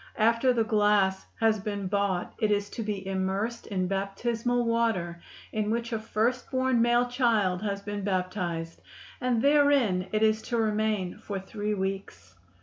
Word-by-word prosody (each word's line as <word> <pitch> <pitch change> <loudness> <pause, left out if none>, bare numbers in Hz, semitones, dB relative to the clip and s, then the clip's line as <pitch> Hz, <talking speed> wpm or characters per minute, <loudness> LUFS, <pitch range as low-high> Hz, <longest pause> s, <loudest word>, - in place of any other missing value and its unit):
After 230 +3 +3
the 235 -2 +2
glass 205 -3 +2
has 220 -1 +3
been 205 -1 -4
bought 195 -2 -1
it 215 -3 +2
is 205 -1 0
to 235 - -5
be 205 -3 -3
immersed 195 +4 -2
in 185 -3 -1
baptismal 230 +5 -1
water 220 -8 0 0.3
in 215 -1 -1
which 230 +1 -2
a 225 - 0
first 225 +3 -1
born 260 -2 +2
male 240 +1 +3
child 225 -7 +1
has 200 -2 -3
been 205 -1 -4
baptized, 180 -3 -2 0.4
and 245 -2 +1
therein 280 -10 +4
it 215 0 +1
is 220 0 +3
to 240 - 0
remain 215 -3 0
for 205 -3 -4
three 210 +2 -3
weeks. 190 - -5
210 Hz, 155 wpm, -28 LUFS, 195-230 Hz, 0.4 s, therein